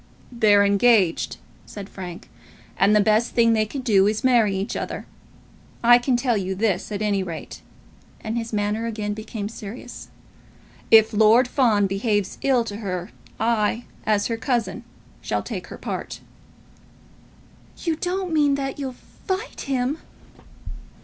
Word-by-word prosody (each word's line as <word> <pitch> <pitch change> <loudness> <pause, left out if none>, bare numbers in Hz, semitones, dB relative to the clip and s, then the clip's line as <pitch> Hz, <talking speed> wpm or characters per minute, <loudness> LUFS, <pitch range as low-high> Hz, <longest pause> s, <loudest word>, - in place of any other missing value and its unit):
"They're 210 -4 +4
engaged," 200 -3 +3 0.3
said 200 -2 -8
Frank, 180 -4 -9 0.5
"and 200 +3 +4
the - - +6
best 215 +3 +2
thing 230 -1 +4
they 215 -1 +1
can 270 +5 -5
do 205 -5 +4
is 215 +1 0
to - - -4
marry 225 -6 +3
each 195 +4 -3
other. - - -4 0.8
I 240 +1 +7
can 245 0 +1
tell 245 -1 +1
you 190 -2 -2
this, 205 -1 -1
at 210 0 -2
any 205 -2 +1
rate," 170 -4 -7 0.6
and 220 0 -4
his 230 -1 -3
manner 210 +2 -1
again 210 -2 -3
became 215 -1 -5
serious, 225 +3 -9 0.8
"if 220 -1 +6
Lord 220 +4 +5
Fawn 230 -6 +2
behaves 200 0 -1
ill 260 -3 +3
to 205 -3 -6
her, 185 -2 -4 0.3
I, 225 +1 +1 0.2
as 210 -1 +1
her 230 - -1
cousin, 240 -1 -2 0.4
shall - - -2
take - - -6
her - - -9
part." - - -5 1.6
"You 330 -2 0
don't 365 0 -3
mean 290 -2 +3
that 275 +1 -4
you'll 265 -3 -4 0.3
fight 390 +5 -3
him!" 270 +2 -1
220 Hz, 150 wpm, -23 LUFS, 205-245 Hz, 1.6 s, I